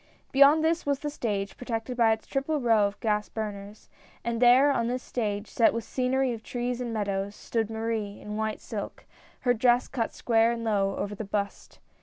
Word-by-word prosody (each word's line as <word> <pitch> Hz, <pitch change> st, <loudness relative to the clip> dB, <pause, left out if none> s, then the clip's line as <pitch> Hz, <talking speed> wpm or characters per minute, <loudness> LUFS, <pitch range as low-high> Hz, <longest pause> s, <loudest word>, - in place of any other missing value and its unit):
Beyond 280 Hz, +3 st, +6 dB
this 330 Hz, +1 st, +1 dB
was 285 Hz, -1 st, 0 dB
the 295 Hz, -, -3 dB
stage, 205 Hz, -8 st, -3 dB
protected 240 Hz, 0 st, -4 dB
by 230 Hz, -2 st, +4 dB
its 220 Hz, 0 st, -1 dB
triple 285 Hz, +3 st, -1 dB
row 225 Hz, -5 st, +4 dB
of 200 Hz, -, -9 dB
gas 210 Hz, -2 st, 0 dB
burners, 210 Hz, -1 st, -6 dB, 0.4 s
and 235 Hz, 0 st, -2 dB
there 255 Hz, +4 st, +6 dB
on 235 Hz, -4 st, 0 dB
this 250 Hz, +1 st, -2 dB
stage 210 Hz, -3 st, -3 dB
set 230 Hz, -1 st, +3 dB
with 230 Hz, -, -2 dB
scenery 260 Hz, +1 st, 0 dB
of 225 Hz, -, -7 dB
trees 245 Hz, +1 st, -3 dB
and 240 Hz, -2 st, -3 dB
meadows, 200 Hz, -2 st, -2 dB
stood 225 Hz, -2 st, -2 dB
Marie 220 Hz, -2 st, -3 dB
in 210 Hz, 0 st, -7 dB
white 220 Hz, 0 st, -2 dB
silk -, -, -6 dB, 0.2 s
— -, -, -28 dB
her 245 Hz, -, +3 dB
dress 245 Hz, +1 st, +3 dB
cut 235 Hz, -4 st, -2 dB
square 230 Hz, 0 st, +2 dB
and 230 Hz, -1 st, -5 dB
low 200 Hz, -3 st, +1 dB
over 205 Hz, -, -3 dB
the 205 Hz, -, -5 dB
bust. 200 Hz, 0 st, -4 dB
230 Hz, 200 wpm, -27 LUFS, 210-250 Hz, 0.4 s, Beyond